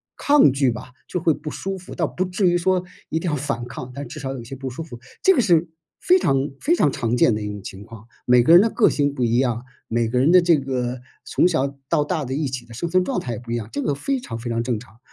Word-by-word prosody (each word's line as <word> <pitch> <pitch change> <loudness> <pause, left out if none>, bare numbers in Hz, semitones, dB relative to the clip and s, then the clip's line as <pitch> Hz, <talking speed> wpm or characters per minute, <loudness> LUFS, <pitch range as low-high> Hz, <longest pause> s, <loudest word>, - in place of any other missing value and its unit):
抗 285 - +5
拒 135 -1 +2
吧， 125 +2 -8 0.2
就 180 - -2
会 165 -1 +2
不 150 +1 -7
舒 195 +5 -4
服， 185 -1 -10
倒 170 - 0
不 180 - -2
至 185 +1 0
于 175 - +3
说 180 +1 +1 0.3
一 160 - -1
定 175 - -4
要 - - 0
反 130 -4 -3
抗， 125 0 -8
但 140 -1 -6
至 155 +6 -8
少 135 -2 -4
有 135 - -5
一 - - -8
些 120 +4 -8
不 135 0 -5
舒 130 +6 -6
服， 125 -7 -10 0.2
这 385 - +6
个 265 - +3
是 175 -5 +3 0.3
非 370 +1 +4
常 135 - +1
非 335 - +3
常 145 - +2
常 120 -3 -1
见 120 - +4
的 105 - -3
一 105 - -4
种 105 -1 -6
情 95 0 -8
况。 110 0 -13 0.2
每 125 -1 +6
个 160 - +5
人 175 - +10
的 225 - +2
个 225 - +3
性 145 -1 +1
不 135 -3 -3
一 120 +1 +2
样， 120 -2 0 0.2
每 115 0 0
个 125 +2 0
人 140 +6 +4
的 180 - +8
这 170 -3 +4
个 130 -2 -3 0.3
从 - - +2
小 140 -5 0
到 150 - +2
大 155 +1 -2
的 130 +1 -3
一 150 +1 -1
起 130 -2 -4
的 115 - -11
生 170 - -3
存 185 +2 +2
状 265 - -1
态 125 - -5
也 110 - -5
不 120 -1 -9
一 - - 0
样， 115 -3 -4
这 145 - -2
个 145 - 0
非 270 - -2
常 115 - -7
非 120 +1 -5
常 115 0 0
正 120 -2 -1
常。 115 0 -17
140 Hz, 315 characters per minute, -22 LUFS, 120-175 Hz, 0.3 s, 人